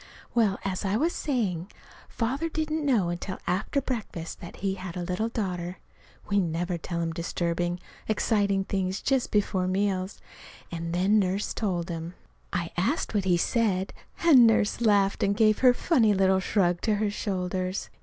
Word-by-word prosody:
Well, 215 Hz, -5 st, +3 dB
as 190 Hz, 0 st, -2 dB
I 200 Hz, +1 st, +1 dB
was 325 Hz, +7 st, +1 dB
saying, 200 Hz, -, -1 dB, 0.4 s
Father 270 Hz, +8 st, -1 dB
didn't 315 Hz, 0 st, -2 dB
know 230 Hz, -11 st, +2 dB
until 175 Hz, +2 st, -4 dB
after 195 Hz, +9 st, 0 dB
breakfast 215 Hz, -10 st, -5 dB
that 170 Hz, -, -9 dB
he 195 Hz, -1 st, -1 dB
had 185 Hz, -2 st, -7 dB
a 180 Hz, -, -2 dB
little 185 Hz, +6 st, -1 dB
daughter. 180 Hz, -5 st, -3 dB, 0.5 s
(We 200 Hz, -1 st, +2 dB
never 175 Hz, 0 st, -1 dB
tell 170 Hz, +1 st, -3 dB
him 165 Hz, -1 st, -2 dB
disturbing, 175 Hz, +1 st, -2 dB, 0.3 s
exciting 205 Hz, -2 st, +1 dB
things 190 Hz, 0 st, -2 dB
just 265 Hz, -2 st, +1 dB
before 190 Hz, -3 st, +1 dB
meals.) 190 Hz, 0 st, -1 dB, 0.5 s
And 165 Hz, -1 st, -4 dB
then 190 Hz, +5 st, +3 dB
Nurse 195 Hz, +1 st, 0 dB
told 180 Hz, -5 st, -2 dB
him. 165 Hz, +1 st, -5 dB, 0.4 s
I 170 Hz, -2 st, -2 dB
asked 210 Hz, -, 0 dB
what 200 Hz, -3 st, 0 dB
he 180 Hz, -2 st, +3 dB
said, 195 Hz, -1 st, 0 dB, 0.3 s
and 270 Hz, -9 st, +8 dB
Nurse 220 Hz, 0 st, +2 dB
laughed 205 Hz, -3 st, +3 dB
and 200 Hz, 0 st, +1 dB
gave 215 Hz, -2 st, +4 dB
her 255 Hz, -1 st, +7 dB
funny 240 Hz, -, +3 dB
little 190 Hz, 0 st, +3 dB
shrug 180 Hz, -3 st, +1 dB
to 215 Hz, -2 st, +1 dB
her 205 Hz, 0 st, 0 dB
shoulders. 185 Hz, -2 st, -3 dB
195 Hz, 165 wpm, -27 LUFS, 180-220 Hz, 0.5 s, and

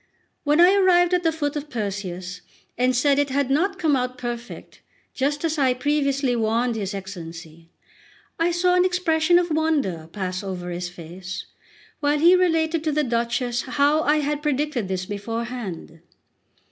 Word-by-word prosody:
When 295 Hz, +2 st, +2 dB
I 355 Hz, +2 st, +7 dB
arrived 365 Hz, -2 st, +4 dB
at 360 Hz, -, +3 dB
the 325 Hz, -2 st, +2 dB
foot 290 Hz, -2 st, -2 dB
of 295 Hz, 0 st, -5 dB
Perseus, 185 Hz, -5 st, -4 dB, 0.3 s
and 250 Hz, +1 st, +1 dB
said 280 Hz, +3 st, +3 dB
it 285 Hz, -1 st, +1 dB
had 270 Hz, 0 st, 0 dB
not 375 Hz, +7 st, +1 dB
come 320 Hz, -5 st, +2 dB
out 250 Hz, -1 st, -2 dB
perfect, 240 Hz, -1 st, -7 dB, 0.3 s
just 290 Hz, +3 st, -1 dB
as 315 Hz, -1 st, -1 dB
I 260 Hz, -2 st, +3 dB
previously 275 Hz, -1 st, 0 dB
warned 230 Hz, +1 st, 0 dB
his 200 Hz, -2 st, -3 dB
Excellency, 165 Hz, -4 st, -9 dB, 0.7 s
I 335 Hz, +1 st, +3 dB
saw 355 Hz, +1 st, +2 dB
an 360 Hz, 0 st, +4 dB
expression 350 Hz, -2 st, +2 dB
of 350 Hz, -1 st, +1 dB
wonder 285 Hz, -, 0 dB
pass 185 Hz, -2 st, -3 dB
over 180 Hz, -2 st, -5 dB
his 175 Hz, 0 st, -4 dB
face, 175 Hz, +2 st, -8 dB, 0.5 s
while 290 Hz, 0 st, +1 dB
he 340 Hz, +5 st, +6 dB
related 325 Hz, -3 st, +1 dB
to 310 Hz, -, +1 dB
the 300 Hz, +1 st, +1 dB
Duchess 240 Hz, 0 st, -1 dB
how 290 Hz, +3 st, +2 dB
I 300 Hz, 0 st, +2 dB
had 295 Hz, 0 st, -2 dB
predicted 295 Hz, -6 st, -1 dB
this 185 Hz, -1 st, -3 dB
beforehand. 210 Hz, -4 st, -5 dB
270 Hz, 160 wpm, -23 LUFS, 200-315 Hz, 0.7 s, I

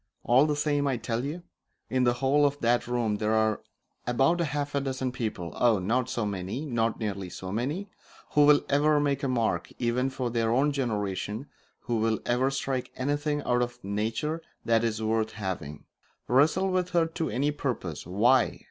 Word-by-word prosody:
All 130 Hz, +5 st, +5 dB
the 150 Hz, -, +1 dB
same, 145 Hz, -1 st, +1 dB
I 130 Hz, -3 st, +1 dB
tell 115 Hz, +1 st, -2 dB
you, 155 Hz, +5 st, -4 dB, 0.4 s
in 130 Hz, -1 st, +1 dB
the 120 Hz, -, +4 dB
whole 135 Hz, +3 st, +2 dB
of 145 Hz, 0 st, +2 dB
that 120 Hz, +1 st, +2 dB
room 120 Hz, -4 st, 0 dB
there 110 Hz, +1 st, 0 dB
are 110 Hz, -1 st, +2 dB, 0.5 s
about 135 Hz, +8 st, +3 dB
half 145 Hz, -3 st, -1 dB
a 140 Hz, -, +1 dB
dozen 130 Hz, -1 st, -2 dB
people, 110 Hz, -, -4 dB
oh, 120 Hz, -3 st, +4 dB
not 120 Hz, +7 st, 0 dB
so 120 Hz, -, -1 dB
many! 100 Hz, +7 st, -3 dB
not 115 Hz, -5 st, 0 dB
nearly 100 Hz, -4 st, -3 dB
so 95 Hz, +1 st, -7 dB
many! 145 Hz, -, -2 dB, 0.4 s
who 145 Hz, -1 st, +5 dB
will 150 Hz, -1 st, +6 dB
ever 150 Hz, +1 st, +3 dB
make 140 Hz, -2 st, 0 dB
a 140 Hz, -, 0 dB
mark, 120 Hz, -3 st, 0 dB
even 125 Hz, +2 st, 0 dB
for 130 Hz, -2 st, -3 dB
their 115 Hz, -1 st, +1 dB
own 135 Hz, +5 st, +3 dB
generation, 105 Hz, -3 st, -2 dB, 0.4 s
who 120 Hz, -1 st, -1 dB
will 110 Hz, 0 st, +1 dB
ever 125 Hz, +2 st, +2 dB
strike 135 Hz, -2 st, -2 dB
anything 145 Hz, +2 st, -1 dB
out 125 Hz, 0 st, +1 dB
of 120 Hz, 0 st, -2 dB
nature 110 Hz, +11 st, -2 dB, 0.2 s
that 115 Hz, 0 st, +3 dB
is 110 Hz, -1 st, -1 dB
worth 110 Hz, 0 st, 0 dB
having 95 Hz, -9 st, -5 dB, 0.4 s
wrestle 160 Hz, +9 st, +3 dB
with 180 Hz, -1 st, 0 dB
her 165 Hz, -, +5 dB
to 165 Hz, 0 st, -3 dB
any 140 Hz, +4 st, 0 dB
purpose. 115 Hz, -, -4 dB
Why? 115 Hz, +6 st, +3 dB
125 Hz, 185 wpm, -28 LUFS, 110-145 Hz, 0.5 s, will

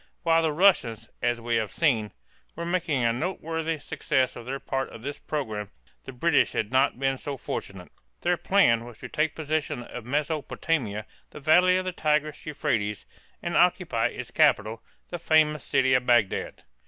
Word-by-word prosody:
While 165 Hz, -1 st, +4 dB
the 160 Hz, -1 st, +1 dB
Russians, 145 Hz, -, +2 dB
as 120 Hz, -1 st, +1 dB
we 115 Hz, 0 st, 0 dB
have 110 Hz, -2 st, -1 dB
seen, 115 Hz, -, +1 dB, 0.4 s
were 170 Hz, -, -5 dB
making 170 Hz, -7 st, 0 dB
a 115 Hz, 0 st, +3 dB
noteworthy 165 Hz, +2 st, -2 dB
success 135 Hz, -2 st, -1 dB
of 120 Hz, 0 st, -9 dB
their 135 Hz, +1 st, -3 dB
part 135 Hz, -1 st, -3 dB
of 115 Hz, -, -11 dB
this 140 Hz, +2 st, -5 dB
program, 110 Hz, -9 st, -4 dB, 0.4 s
the -, -, -7 dB
British 145 Hz, +5 st, +2 dB
had 110 Hz, 0 st, -2 dB
not 130 Hz, -1 st, +3 dB
been 135 Hz, -1 st, 0 dB
so 140 Hz, -1 st, -5 dB
fortunate. 95 Hz, -6 st, -6 dB, 0.3 s
Their 175 Hz, +1 st, +2 dB
plan 165 Hz, -12 st, +3 dB
was 120 Hz, -2 st, -11 dB
to -, -, -9 dB
take 155 Hz, -1 st, 0 dB
possession 155 Hz, -5 st, -2 dB
of 120 Hz, -1 st, -9 dB
Mesopotamia, 145 Hz, -5 st, -1 dB, 0.2 s
the -, -, -10 dB
valley 180 Hz, +5 st, +5 dB
of 185 Hz, -, -2 dB
the 185 Hz, -, -1 dB
Tigris 150 Hz, -3 st, 0 dB
Euphrates, 115 Hz, -9 st, -2 dB, 0.4 s
and -, -, -2 dB
occupy -, -, +3 dB
its -, -, -7 dB
capital, 110 Hz, +2 st, +2 dB, 0.3 s
the 175 Hz, -, -5 dB
famous 155 Hz, -3 st, +3 dB
city 130 Hz, -1 st, +2 dB
of 125 Hz, -1 st, +2 dB
Bagdad. 120 Hz, -5 st, +1 dB
140 Hz, 170 wpm, -26 LUFS, 120-160 Hz, 0.4 s, valley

